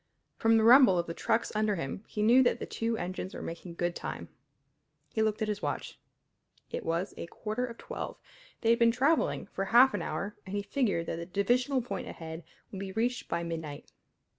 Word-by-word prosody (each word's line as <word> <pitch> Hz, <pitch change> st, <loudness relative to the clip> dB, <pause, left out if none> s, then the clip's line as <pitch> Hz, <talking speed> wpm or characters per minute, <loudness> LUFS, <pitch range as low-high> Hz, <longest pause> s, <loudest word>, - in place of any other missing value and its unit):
From 225 Hz, 0 st, +4 dB
the 220 Hz, -, +3 dB
rumble 235 Hz, -5 st, +8 dB
of 170 Hz, -, +1 dB
the 165 Hz, -, -5 dB
trucks 225 Hz, +5 st, 0 dB
under 215 Hz, -1 st, +2 dB
him 165 Hz, +4 st, -4 dB
he 210 Hz, -, -2 dB
knew 240 Hz, +4 st, +7 dB
that 245 Hz, -, +3 dB
the -, -, -4 dB
two 230 Hz, 0 st, -2 dB
engines 185 Hz, 0 st, -4 dB
were -, -, -6 dB
making 170 Hz, +1 st, -7 dB
good 175 Hz, 0 st, -1 dB
time. -, -, -6 dB, 0.8 s
He 220 Hz, -, 0 dB
looked 215 Hz, 0 st, +1 dB
at -, -, -1 dB
his 210 Hz, -1 st, -2 dB
watch. -, -, -4 dB, 0.7 s
It -, -, -3 dB
was 170 Hz, +4 st, -1 dB
a -, -, -5 dB
quarter 220 Hz, +7 st, -3 dB
of 235 Hz, -1 st, -9 dB
twelve. -, -, -6 dB, 0.4 s
They 230 Hz, -, +4 dB
had 235 Hz, -, +3 dB
been 230 Hz, 0 st, +6 dB
travelling 275 Hz, +7 st, +2 dB
for 195 Hz, 0 st, -4 dB
half 245 Hz, +5 st, +6 dB
an 205 Hz, -, -1 dB
hour 185 Hz, +6 st, -3 dB
and 190 Hz, +1 st, -6 dB
he 205 Hz, -, -1 dB
figured 205 Hz, -6 st, 0 dB
that 165 Hz, -, -3 dB
the 170 Hz, 0 st, -6 dB
divisional 245 Hz, +7 st, +1 dB
point 250 Hz, -, -5 dB
ahead 160 Hz, 0 st, -7 dB, 0.3 s
would 195 Hz, -, -6 dB
be 195 Hz, -1 st, -5 dB
reached 240 Hz, +5 st, -1 dB
by 170 Hz, 0 st, -1 dB
midnight. 160 Hz, -3 st, -6 dB
210 Hz, 210 wpm, -30 LUFS, 175-235 Hz, 0.8 s, rumble